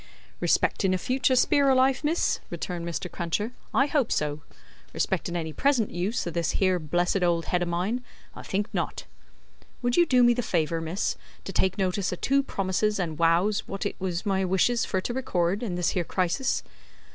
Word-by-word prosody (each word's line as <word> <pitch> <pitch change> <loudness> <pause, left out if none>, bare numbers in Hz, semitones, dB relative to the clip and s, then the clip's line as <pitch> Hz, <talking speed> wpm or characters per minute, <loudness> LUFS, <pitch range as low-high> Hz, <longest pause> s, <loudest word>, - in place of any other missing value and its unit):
"Respectin' 185 -1 +2
a - - +1
future 255 +6 +1
spear 280 +2 +4
o' 265 - +5
life, 260 +2 +3
miss," 320 +4 +1
returned 175 -2 -4
Mr. 170 +2 -3
Cruncher, 180 +6 -2 0.2
"I 270 - +3
hope 285 -5 0
so. 150 0 -1 0.5
Respectin' 175 - -1
any 160 -2 -3
present 260 - +1
use 190 +7 -2
o' 170 - -3
this 170 -1 -1
here 185 -2 +2
blessed 175 +4 0
old 170 -2 +1
head 180 - 0
o' 175 - 0
mine, 190 +9 -1 0.3
I - - -8
think 205 +2 -2
not. 175 -4 -3 0.8
Would 245 0 +1
you 345 -1 +5
do 250 -3 +5
me 240 0 +6
the 245 - -1
favour, 165 -6 0
miss, 165 +5 -2 0.3
to - - -6
take 190 0 +1
notice 190 0 0
o' - - -2
two 275 +9 +2
promises 210 -3 -1
and 165 -5 -3
wows 170 +5 +2
wot 195 +1 -4
it 205 - -2
is 185 +1 -2
my 190 -2 +1
wishes 190 +6 +2
fur 190 - -1
to 240 - -3
record 190 -7 0
in 205 -7 -3
this 180 -1 +1
here 180 - 0
crisis?" 185 +10 0
190 Hz, 190 wpm, -26 LUFS, 175-240 Hz, 0.8 s, me